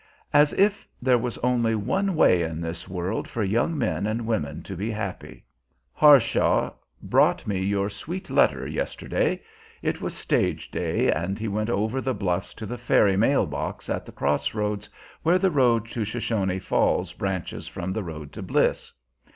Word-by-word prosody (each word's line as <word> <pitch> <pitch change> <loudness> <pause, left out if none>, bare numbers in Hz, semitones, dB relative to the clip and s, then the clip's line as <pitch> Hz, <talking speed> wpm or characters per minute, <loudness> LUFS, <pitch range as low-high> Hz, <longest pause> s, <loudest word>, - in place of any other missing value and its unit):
As 145 0 +6
if 200 +1 +2
there 125 -1 +3
was 120 0 -3
only 120 -2 +2
one 190 - 0
way 90 - +5
in 80 -1 -3
this 85 0 -5
world 90 +3 -3
for 115 - -2
young 115 - +1
men 110 -5 0
and 110 +2 -2
women 75 -10 -2
to 95 - -7
be 100 +6 -3
happy! 110 0 -6 0.5
Harshaw 145 -6 +5 0.3
brought - - +3
me 95 -2 -1
your 100 +1 0
sweet 170 - -6
letter - - +3
yesterday. - - -2 0.4
It - - -1
was - - -4
stage - - 0
day, - - +1
and 85 +5 -2
he 115 - -3
went 105 +2 -1
up 120 - +1
over 110 +6 -1
the 130 -2 -1
bluffs 90 -3 -2
to 110 - -7
the 120 +3 -5
ferry 100 -2 +3
mail 115 +8 +3
box - - -5
at - - -3
the - - -9
cross 75 +4 -1
roads, 105 0 -2 0.3
where 170 +3 +4
the 190 0 +2
road 120 -6 +3
to 115 - -2
Shoshone 105 -4 -1
Falls 95 - +1
branches 95 -3 -4
from 90 +2 -4
the 110 - -2
road 75 -5 -7
to - - -8
Bliss. - - 0
110 Hz, 175 wpm, -25 LUFS, 95-125 Hz, 0.5 s, As